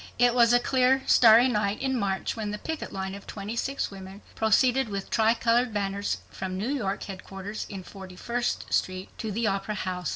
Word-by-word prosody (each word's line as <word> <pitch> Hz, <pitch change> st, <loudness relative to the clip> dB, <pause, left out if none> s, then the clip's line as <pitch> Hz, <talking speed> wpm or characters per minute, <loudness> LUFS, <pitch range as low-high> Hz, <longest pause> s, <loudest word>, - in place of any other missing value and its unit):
It 245 Hz, 0 st, +4 dB
was 235 Hz, -1 st, +5 dB
a 245 Hz, -, +6 dB
clear 260 Hz, +1 st, +2 dB
starry 230 Hz, +1 st, +7 dB
night 210 Hz, -4 st, 0 dB
in 265 Hz, -1 st, -1 dB
March 195 Hz, -5 st, -1 dB
when 220 Hz, -2 st, -3 dB
the 210 Hz, -, -3 dB
picket 320 Hz, +7 st, -5 dB
line 190 Hz, 0 st, -4 dB
of 200 Hz, 0 st, -10 dB
26 225 Hz, +7 st, -3 dB
women 195 Hz, +1 st, -10 dB
proceeded 245 Hz, +3 st, +2 dB
with 195 Hz, -1 st, -5 dB
tri 225 Hz, +1 st, +3 dB
colored 235 Hz, +1 st, +2 dB
banners 200 Hz, 0 st, -2 dB
from 185 Hz, -1 st, -5 dB
New 210 Hz, +6 st, -2 dB
York 200 Hz, -8 st, -2 dB
headquarters 195 Hz, +2 st, -7 dB
in 195 Hz, -2 st, -7 dB
Forty 190 Hz, -1 st, -11 dB
first 240 Hz, +5 st, -3 dB
street 185 Hz, 0 st, -1 dB
to 220 Hz, -, -3 dB
the 225 Hz, +3 st, -1 dB
Opera 200 Hz, +1 st, -1 dB
House. 185 Hz, -2 st, -3 dB
210 Hz, 190 wpm, -27 LUFS, 195-240 Hz, -, starry